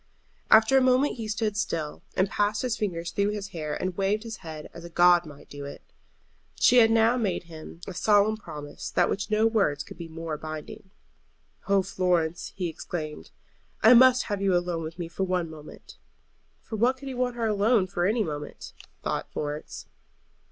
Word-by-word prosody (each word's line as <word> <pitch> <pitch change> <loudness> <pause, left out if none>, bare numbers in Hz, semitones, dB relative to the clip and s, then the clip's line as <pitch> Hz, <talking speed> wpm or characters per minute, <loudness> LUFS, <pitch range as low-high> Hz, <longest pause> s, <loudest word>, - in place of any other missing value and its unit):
After 220 +5 +6
a - - +1
moment 255 +2 +3
he 225 -2 -5
stood 215 0 -1
still, 165 -7 -3 0.2
and 190 - +3
passed 205 +3 0
his 245 -3 0
fingers 170 -6 -3
through 200 +2 +1
his 205 -1 -4
hair 155 -3 -4
and 185 -1 -2
waved 200 +3 0
his 225 -2 -7
head 155 -3 -8
as 170 - -10
a 170 - -8
god 175 0 +5
might 145 -2 -13
do 145 0 -9
it. 140 - -9 0.8
She 250 - +5
had 225 -2 +7
now 225 +2 +4
made 205 -7 -1
to 170 - -22
him 160 +1 -10
a 195 - -7
solemn 210 +3 +3
promise 150 -8 -8
than - - +2
which 200 +1 -3
no 215 +1 +3
words 200 -11 +1
could - - -13
be 170 - -6
more 160 -1 -5
binding. 155 +4 -8 0.8
"Oh, 195 -1 +3
Florence," 180 -3 0
he 185 -3 -2
exclaimed, 155 -1 -6 0.5
"I 225 - +9
must 255 +1 +7
have 205 -2 -3
you 190 -2 +3
alone 175 -1 -2
with 160 +1 -7
me 175 -2 -4
for 170 +3 -3
one 180 -3 -1
moment." 155 -1 -12 0.7
For 220 - -6
what 250 +4 +2
could 275 +1 -10
he 265 - -4
want 250 -1 -1
her 235 -1 -1
alone 210 0 +3
for 180 -1 -1
any 220 +2 +1
moment? 150 -3 -7 0.3
thought - - -3
Florence. 150 0 -5
190 Hz, 195 wpm, -27 LUFS, 165-220 Hz, 0.8 s, I